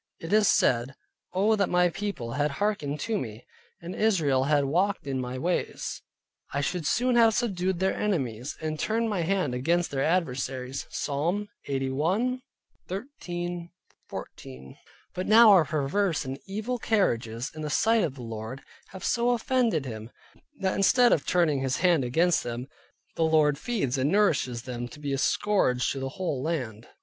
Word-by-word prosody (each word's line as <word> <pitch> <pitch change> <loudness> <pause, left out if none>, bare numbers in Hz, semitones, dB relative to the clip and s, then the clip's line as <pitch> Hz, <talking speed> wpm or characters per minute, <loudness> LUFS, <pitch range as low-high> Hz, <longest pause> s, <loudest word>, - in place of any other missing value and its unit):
It 165 +4 -5
is 215 -1 +5
said, 125 +3 +2 0.4
"Oh, 205 +4 +3
that 200 -2 +1
my 180 0 +3
People 195 - -4
had 145 +4 0
hearkened 150 -3 -2
to 220 -2 -1
me, 110 -1 -7 0.4
and 170 +2 -6
Israel 155 -12 +2
had 145 -1 +2
walked 185 +7 0
in 135 -2 -2
my 125 +1 -4
ways, 175 +7 -2 0.5
I 140 - -1
should 155 +2 -2
soon 250 +1 +2
have 225 -2 +5
subdued 190 -6 0
their 190 +2 +1
Enemies, 130 - -2
and 155 -1 -3
turned 225 +1 0
my 190 -4 0
hand 180 -5 0
against 170 +8 0
their 135 -1 0
Adversaries" 135 -6 -1
(Psalm 170 +9 -2 0.2
81.13 175 - -3 0.4
14). 65 0 -9 0.4
But 185 - -4
now 220 +1 +8
our 180 -5 +6
perverse 155 +3 0
and 135 +1 -5
evil 220 +5 -3
carriages 120 - 0
in 155 - -8
the 150 - -3
sight 225 +7 +3
of 150 -6 -2
the 125 - -9
Lord, 115 +3 -6 0.2
have 190 - -10
so 240 0 +2
offended 235 - +1
Him, 110 -2 -7 0.5
that 190 -1 +1
instead 240 +5 +4
of 145 - -1
turning 165 -6 +2
His 130 -1 0
hand 175 -6 +3
against 165 +8 +2
them, 120 +2 -5 0.5
the - - -3
Lord 155 -3 +3
feeds 190 - -1
and 140 +4 +1
nourishes 140 - +2
them 120 -2 -5
up - - -8
to 150 - -11
be 145 -2 -3
a 135 - -1
scourge 135 -10 +1
to 135 - -4
the 135 0 -3
whole 150 -4 -3
land. 125 -8 -3
160 Hz, 165 wpm, -27 LUFS, 130-200 Hz, 0.5 s, now